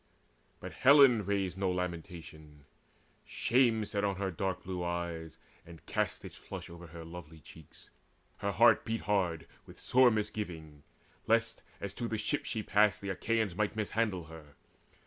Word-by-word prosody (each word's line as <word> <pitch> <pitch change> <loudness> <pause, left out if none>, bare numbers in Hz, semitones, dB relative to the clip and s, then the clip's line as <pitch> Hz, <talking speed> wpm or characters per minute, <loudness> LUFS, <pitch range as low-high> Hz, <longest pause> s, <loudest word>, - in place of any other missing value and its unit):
But - - -8
Helen 130 -6 +6
raised 95 -2 -1
no 95 -1 +1
lamentation: 85 -5 -6 0.6
shame 115 -3 +2
Sat 100 -1 -2
on 100 -1 +1
her 95 0 -2
dark 95 +1 -3
blue 90 -1 -4
eyes, 85 -2 -4 0.3
and 85 -2 -14
cast - - -2
its - - -9
flush - - -9
Over 85 0 -10
her 80 0 -10
lovely 80 -1 -10
cheeks. 80 +1 -16 0.5
Her 100 - -2
heart 110 +4 +5
beat 115 0 -2
hard 90 -6 0 0.2
With - - -13
sore 130 0 +5
misgiving, 90 -9 -4 0.5
lest, - - +1 0.2
as 100 -1 -5
to 120 +2 -4
the 110 - -2
ships 110 +7 -2
She 110 -2 -2
passed, 105 0 +3
the 100 - -5
Achaeans 110 +1 0
might 105 +3 -1
mishandle 110 -3 -1
her. 80 -3 -13
95 Hz, 155 wpm, -32 LUFS, 85-110 Hz, 0.6 s, Helen